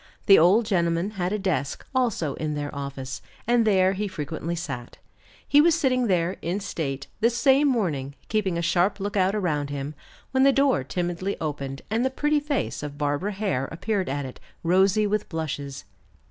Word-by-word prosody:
The 195 Hz, -, +8 dB
old 195 Hz, +8 st, +5 dB
gentleman 170 Hz, -1 st, +1 dB
had 185 Hz, -3 st, -2 dB
a 210 Hz, -, 0 dB
desk, 170 Hz, -9 st, -2 dB
also, 230 Hz, -, 0 dB
in 155 Hz, -1 st, -3 dB
their 145 Hz, 0 st, -4 dB
office, 140 Hz, -2 st, -5 dB, 0.2 s
and 235 Hz, -1 st, +3 dB
there 190 Hz, -2 st, +4 dB
he 205 Hz, +2 st, -2 dB
frequently 165 Hz, -1 st, -4 dB
sat. 135 Hz, -8 st, -6 dB, 0.5 s
He 290 Hz, -, +6 dB
was 330 Hz, 0 st, +4 dB
sitting 255 Hz, -3 st, +1 dB
there, 180 Hz, -2 st, +1 dB
in 175 Hz, +4 st, -2 dB
state, 140 Hz, -8 st, -4 dB
this 230 Hz, +2 st, +2 dB
same 275 Hz, +2 st, +4 dB
morning, 155 Hz, -, -1 dB
keeping 200 Hz, -5 st, 0 dB
a 170 Hz, -, -1 dB
sharp 175 Hz, +4 st, +2 dB
lookout 195 Hz, 0 st, +1 dB
around 150 Hz, -8 st, -1 dB
him, 145 Hz, +1 st, -4 dB, 0.4 s
when 265 Hz, -, +2 dB
the 275 Hz, +1 st, +6 dB
door 275 Hz, -, +2 dB
timidly 175 Hz, +6 st, -2 dB
opened, 140 Hz, -3 st, -4 dB
and 225 Hz, +2 st, +1 dB
the 260 Hz, -, +2 dB
pretty 295 Hz, +3 st, +1 dB
face 290 Hz, -1 st, -2 dB
of 145 Hz, -1 st, -6 dB
Barbara 145 Hz, +8 st, -1 dB
Hare 190 Hz, -10 st, -1 dB
appeared 190 Hz, +3 st, -1 dB
at 140 Hz, 0 st, -2 dB
it, 130 Hz, -, -9 dB, 0.2 s
rosy 190 Hz, +5 st, +3 dB
with 210 Hz, 0 st, -1 dB
blushes. 145 Hz, -4 st, -4 dB
185 Hz, 175 wpm, -25 LUFS, 150-215 Hz, 0.5 s, The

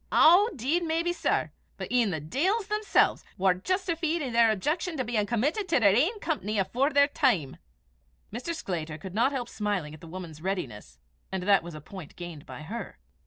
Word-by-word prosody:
"Ow, 370 Hz, +7 st, +6 dB
'deed 280 Hz, +8 st, 0 dB
maybe, 335 Hz, +1 st, 0 dB
sir! 340 Hz, -1 st, 0 dB, 0.3 s
but -, -, -6 dB
e'en 245 Hz, -4 st, +3 dB
the 160 Hz, -4 st, -2 dB
deils 350 Hz, -, 0 dB
themsel's 425 Hz, 0 st, +2 dB
war 190 Hz, -1 st, +4 dB
justifeed 335 Hz, -, -1 dB
i' 260 Hz, -, -3 dB
their 230 Hz, -1 st, +5 dB
objection 300 Hz, -, -1 dB
to 260 Hz, -, 0 dB
bein' 220 Hz, -3 st, -1 dB
committed 295 Hz, -, 0 dB
to 325 Hz, -, +4 dB
their 200 Hz, -3 st, +5 dB
ain 350 Hz, -, +2 dB
company 285 Hz, -, -2 dB
afore 235 Hz, +9 st, +1 dB
their 285 Hz, -1 st, +5 dB
time." 225 Hz, -, +1 dB, 0.8 s
Mr. 255 Hz, +9 st, -3 dB
Sclater 160 Hz, -, -4 dB
could 180 Hz, +4 st, -9 dB
not 235 Hz, +6 st, +2 dB
help 255 Hz, -4 st, -3 dB
smiling 200 Hz, -8 st, -2 dB
at 155 Hz, -, -12 dB
the 165 Hz, -, -11 dB
woman's 165 Hz, -3 st, -8 dB
readiness, 130 Hz, -, -4 dB, 0.3 s
and 190 Hz, -1 st, -2 dB
that 200 Hz, +1 st, +4 dB
was 170 Hz, -1 st, -9 dB
a 155 Hz, -, -8 dB
point 180 Hz, 0 st, -10 dB
gained 175 Hz, -4 st, -8 dB
by 150 Hz, -, -8 dB
her. 225 Hz, +9 st, -6 dB
230 Hz, 190 wpm, -28 LUFS, -, 0.8 s, Ow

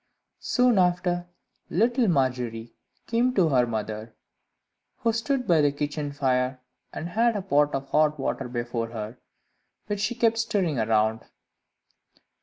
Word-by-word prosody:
Soon 245 Hz, -4 st, +3 dB
after, 175 Hz, -1 st, +1 dB, 0.4 s
little 235 Hz, +5 st, +2 dB
Margery 125 Hz, -, -1 dB, 0.3 s
came 245 Hz, +2 st, +1 dB
to 175 Hz, -5 st, +4 dB
her 125 Hz, -3 st, +3 dB
mother, 110 Hz, 0 st, -4 dB, 0.8 s
who 230 Hz, -1 st, 0 dB
stood 250 Hz, +3 st, -1 dB
by 165 Hz, -3 st, +4 dB
the 145 Hz, -1 st, +3 dB
kitchen 145 Hz, 0 st, -3 dB
fire, 130 Hz, -2 st, 0 dB, 0.3 s
and 170 Hz, -, -5 dB
had 230 Hz, +4 st, +2 dB
a 205 Hz, -, -1 dB
pot 145 Hz, -6 st, +2 dB
of 135 Hz, 0 st, -4 dB
hot 150 Hz, -1 st, +2 dB
water 135 Hz, -1 st, -2 dB
before 120 Hz, -1 st, -3 dB
her, 115 Hz, +1 st, -7 dB, 0.7 s
which 205 Hz, -1 st, -3 dB
she 230 Hz, +4 st, -1 dB
kept 230 Hz, -1 st, +2 dB
stirring 200 Hz, -, 0 dB
round. 110 Hz, 0 st, +1 dB
150 Hz, 135 wpm, -26 LUFS, -, 0.8 s, to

